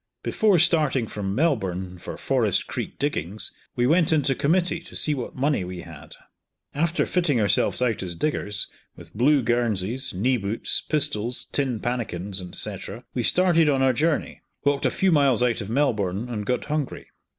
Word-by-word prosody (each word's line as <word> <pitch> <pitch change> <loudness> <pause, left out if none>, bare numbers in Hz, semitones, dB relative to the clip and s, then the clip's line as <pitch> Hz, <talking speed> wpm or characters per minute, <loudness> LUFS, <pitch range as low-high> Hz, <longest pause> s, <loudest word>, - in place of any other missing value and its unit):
Before 210 -5 +3
starting 150 -7 +3
from 100 -2 -4
Melbourne 95 - -1
for - - -7
Forest - - +1
Creek - - -5
diggings, 110 - -2 0.2
we 120 - +2
went 165 +4 +3
into 145 -4 +3
committee 170 +5 +1
to - - -13
see 150 - +2
what 130 -4 -5
money 140 -5 +1
we 90 -1 -6
had - - -12 0.6
After 170 +3 +1
fitting 165 -9 +1
ourselves 105 +4 +2
out 115 -4 0
as 90 -3 -4
diggers, 105 - -2 0.3
with 85 0 -10
blue 135 +4 +4
guernseys, 120 0 0
knee 125 +8 +1
boots, 105 +1 -2
pistols, 125 -6 -1
tin 130 -5 -1
pannikins, 100 -6 -3
&c., 105 -2 -3 0.4
we 125 - -1
started 165 +3 +4
on 135 -2 +2
our 130 -1 +4
journey, 155 +4 -1 0.2
walked 140 -1 +2
a - - +2
few 190 -1 +1
miles 140 -6 +4
out 120 -2 +1
of 100 - -6
Melbourne, 110 -5 0
and 105 -4 -4
got 125 - 0
hungry. 150 -2 -3
125 Hz, 165 wpm, -24 LUFS, 105-150 Hz, 0.6 s, blue